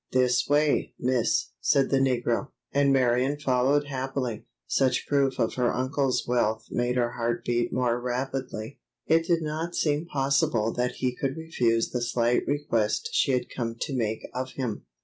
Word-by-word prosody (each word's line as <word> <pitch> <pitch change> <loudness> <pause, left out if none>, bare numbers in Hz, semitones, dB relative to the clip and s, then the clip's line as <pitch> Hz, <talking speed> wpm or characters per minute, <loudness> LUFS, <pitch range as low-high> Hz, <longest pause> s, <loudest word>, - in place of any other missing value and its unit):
"This 125 -1 +3
way, 145 +1 +2
miss," 125 -2 +1
said 135 -1 +2
the 135 - +4
negro, 125 0 +1 0.2
and 140 0 +3
Marion 130 +1 +2
followed 140 +1 +2
happily. 130 -4 -3 0.2
Such 130 - +1
proof 140 -2 +2
of 115 -2 0
her 125 -1 +1
uncle's 130 +1 0
wealth 115 -2 +1
made 120 +1 0
her 120 -1 +1
heart 120 0 -2
beat 120 0 0
more 120 -1 0
rapidly. 125 -1 -4 0.3
It 165 +1 +3
did 170 -2 +2
not 160 +3 -3
seem 150 +2 0
possible 135 -6 +1
that 125 0 -1
he 125 -1 -2
could 135 +2 -2
refuse 120 -8 0
the 125 - -2
slight 120 0 +1
request 120 -7 0
she 135 - +2
had 125 - -1
come 115 -2 -2
to 140 - -2
make 110 -3 -2
of 130 +1 -4
him. 125 -6 -4
130 Hz, 165 wpm, -27 LUFS, 120-140 Hz, 0.3 s, the